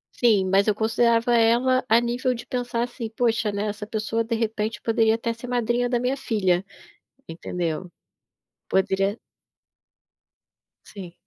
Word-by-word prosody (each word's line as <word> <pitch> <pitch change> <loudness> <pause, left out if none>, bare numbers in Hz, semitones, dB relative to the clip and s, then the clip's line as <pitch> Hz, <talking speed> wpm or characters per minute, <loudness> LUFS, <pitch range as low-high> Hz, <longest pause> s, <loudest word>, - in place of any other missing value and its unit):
Sim, 215 -6 +3
mas 195 +2 +3
eu 210 - +2
considerava 230 +2 +2
ela 240 +3 +3
a 225 - +6
nível 245 +2 -1
de 240 +1 -8
pensar, 245 -1 -2
assim: 240 -2 -5
"Poxa, 230 -1 0
né, 200 0 -3
essa 210 0 -5
pessoa, 225 0 -1
de 230 +1 -2
repente, 220 -1 -2
poderia 225 -1 +2
até 230 0 -2
ser 230 +2 -10
madrinha 245 0 0
da 245 - +1
minha 250 +2 0
filha", 190 -9 0 0.6
entendeu? 170 +1 -4 0.8
Poderia 195 +2 0 1.7
Sim. 185 -4 -10
225 Hz, 140 wpm, -24 LUFS, 210-240 Hz, 1.7 s, a